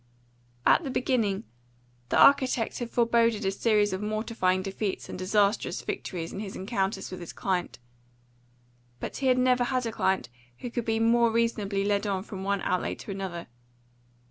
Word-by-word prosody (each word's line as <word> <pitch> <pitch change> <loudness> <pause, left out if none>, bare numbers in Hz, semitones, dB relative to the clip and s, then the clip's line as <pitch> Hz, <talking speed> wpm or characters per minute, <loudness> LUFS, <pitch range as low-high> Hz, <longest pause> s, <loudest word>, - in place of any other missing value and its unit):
At - - +5
the 280 - -4
beginning, 235 -7 0 0.7
the - - +2
architect 260 -5 +4
had 240 -1 -4
foreboded 230 -3 +2
a 195 - +2
series 210 0 +2
of 190 - -3
mortifying 210 -3 0
defeats 195 0 -3
and - - -6
disastrous 200 +2 +1
victories 170 -2 -4
in - - -5
his 205 -2 -6
encounters 195 -1 -2
with 185 - -6
his 175 - -7
client; 185 -2 -2 1.2
but - - -5
he 270 - -1
had 255 -1 +4
never 250 -1 +3
had 255 -1 -1
a 230 - -2
client 190 - 0 0.3
who 245 - -6
could 240 -1 -3
be 225 0 +1
more 235 +1 +4
reasonably 215 -4 0
led 205 +1 +1
on 190 -2 -1
from 195 -2 -7
one 200 0 -1
outlay 180 0 0
to - - -8
another. 190 -3 -5
210 Hz, 170 wpm, -28 LUFS, 190-235 Hz, 1.2 s, At